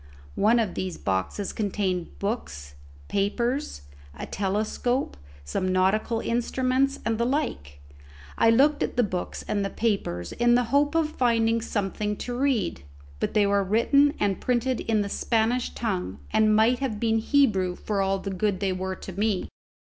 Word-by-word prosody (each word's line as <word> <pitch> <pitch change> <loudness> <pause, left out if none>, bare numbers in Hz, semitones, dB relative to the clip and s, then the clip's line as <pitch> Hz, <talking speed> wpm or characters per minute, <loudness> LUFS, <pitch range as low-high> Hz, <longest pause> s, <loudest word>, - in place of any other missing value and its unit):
One 220 +4 +3
of 220 -6 0
these 185 -2 -4
boxes 95 - -2
contained 190 -4 -2
books, 70 - -4 0.3
papers, 235 - -1 0.3
a - - -5
telescope, 215 +6 -1 0.3
some 185 - -2
nautical 210 +5 +1
instruments, 255 +3 0
and 225 0 0
the 235 - +2
like. 235 - -2 0.6
I 230 - +4
looked 285 +6 +4
at - - -2
the 245 - +4
books 185 -4 -4
and 205 -1 0
the 195 - -1
papers, 195 - -2
in 240 0 +3
the 245 - +3
hope 290 +2 +3
of 320 -2 +2
finding 230 -3 +2
something 210 -1 -2
to 245 - -5
read; 250 - 0 0.4
but - - -2
they 210 -1 +5
were 200 0 +2
written 280 +8 +3
and 200 -2 0
printed 250 0 0
in 220 -2 +1
the 200 - -2
Spanish 230 +4 0
tongue, 185 - -3
and 215 -1 +4
might 225 +3 +4
have 250 -6 -2
been 225 0 +2
Hebrew 215 -9 +2
for 200 +1 -2
all 195 0 +1
the 195 +1 -5
good 190 0 -1
they 195 -2 0
were 190 0 -3
to 190 - -9
me. 205 0 -1
215 Hz, 160 wpm, -26 LUFS, 195-240 Hz, 0.6 s, they